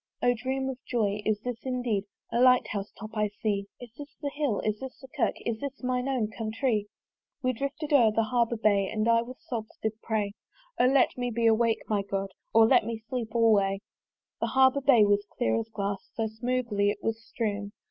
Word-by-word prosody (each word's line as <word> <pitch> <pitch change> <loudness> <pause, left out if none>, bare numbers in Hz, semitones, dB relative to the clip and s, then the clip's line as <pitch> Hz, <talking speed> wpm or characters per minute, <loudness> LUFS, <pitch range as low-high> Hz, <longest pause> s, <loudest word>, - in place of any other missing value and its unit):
O 245 - +5
dream 265 +3 -2
of 260 -1 -4
joy! 210 -4 0
is 210 -1 +1
this 245 -1 -4
indeed 245 -6 -1 0.3
The 235 - +1
light 250 0 +5
house 200 -1 -4
top 215 0 -7
I 210 -1 +1
see? 205 -1 -2
Is 240 -2 -11
this 285 -1 -9
the 285 -1 -3
Hill? 290 -8 0
Is 215 0 -1
this 265 -1 -8
the 265 - -12
Kirk? 265 - +1
Is 225 -2 -1
this 280 -1 -6
mine 250 0 0
own 235 -5 0
countrée? 220 -1 -1 0.6
We 255 0 +2
drifted 280 +4 -3
o'er 240 -6 +6
the 225 +1 +2
Harbour 235 0 +1
bar, 215 -1 +4 0.2
And 215 0 -1
I 230 0 +5
with 250 +2 -8
sobs 235 -10 -6
did 220 0 0
pray 210 -3 -1 0.5
"O 250 - +6
let 270 0 +3
me 245 0 0
be 235 0 -1
awake, 225 0 +3
my 210 -2 +1
God! 195 0 -3 0.2
"Or 225 0 +7
let 220 - +5
me 230 +1 -3
sleep 235 -3 -4
alway!" 205 -4 +4 0.6
The - - 0
harbour 265 +1 +4
bay 250 -6 +6
was 205 0 +2
clear 245 - +2
as 225 0 -5
glass, 200 -2 -3
So 225 - 0
smoothly 220 -2 0
it 205 0 -4
was 225 0 -2
strewn! 205 -3 -3
225 Hz, 210 wpm, -28 LUFS, 210-255 Hz, 0.6 s, Or